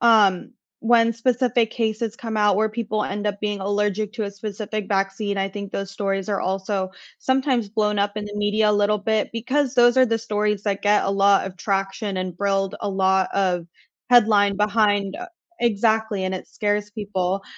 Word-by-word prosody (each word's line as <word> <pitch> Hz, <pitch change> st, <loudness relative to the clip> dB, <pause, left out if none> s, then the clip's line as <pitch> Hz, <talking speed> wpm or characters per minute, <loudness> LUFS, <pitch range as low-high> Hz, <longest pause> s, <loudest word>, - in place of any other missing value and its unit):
um, 215 Hz, -6 st, +4 dB, 0.3 s
when 230 Hz, 0 st, +4 dB
specific 235 Hz, -1 st, +1 dB
cases 220 Hz, -1 st, -2 dB
come 225 Hz, -2 st, -5 dB
out 210 Hz, -1 st, +3 dB
where 215 Hz, +3 st, +2 dB
people 215 Hz, -1 st, -2 dB
end 205 Hz, +1 st, -3 dB
up 205 Hz, -1 st, -2 dB
being 205 Hz, -1 st, -2 dB
allergic 205 Hz, +1 st, -1 dB
to 230 Hz, -2 st, -4 dB
a 200 Hz, -, -3 dB
specific 210 Hz, +1 st, -5 dB
vaccine, 195 Hz, +1 st, -1 dB
I 195 Hz, 0 st, 0 dB
think 200 Hz, 0 st, -7 dB
those 195 Hz, 0 st, -4 dB
stories 195 Hz, 0 st, -2 dB
are 200 Hz, -, -1 dB
also 190 Hz, 0 st, -2 dB, 0.3 s
sometimes 260 Hz, -4 st, 0 dB
blown 210 Hz, -1 st, 0 dB
up 205 Hz, +1 st, 0 dB
in 210 Hz, -, -3 dB
the 205 Hz, 0 st, -7 dB
media 210 Hz, +1 st, +2 dB
a -, -, +2 dB
little 205 Hz, +1 st, +2 dB
bit, 215 Hz, +1 st, 0 dB
because 260 Hz, +4 st, -1 dB
those 240 Hz, 0 st, +5 dB
are 255 Hz, -1 st, +6 dB
the 225 Hz, 0 st, 0 dB
stories 210 Hz, -2 st, -1 dB
that 200 Hz, -2 st, -2 dB
get 205 Hz, 0 st, +3 dB
a -, -, 0 dB
lot 195 Hz, 0 st, +3 dB
of 185 Hz, -1 st, -8 dB
traction 195 Hz, +1 st, -2 dB
and 185 Hz, -2 st, -4 dB
build 195 Hz, 0 st, 0 dB
a 205 Hz, -, -2 dB
lot 190 Hz, -1 st, +2 dB
of 180 Hz, -3 st, 0 dB, 0.4 s
headline 210 Hz, -4 st, +5 dB
behind 205 Hz, -2 st, +1 dB, 0.4 s
exactly, 220 Hz, -2 st, +1 dB
and 185 Hz, -, -2 dB
it 185 Hz, -, -6 dB
scares 205 Hz, 0 st, -1 dB
people, 195 Hz, -2 st, -2 dB
205 Hz, 185 wpm, -22 LUFS, 195-220 Hz, 0.4 s, are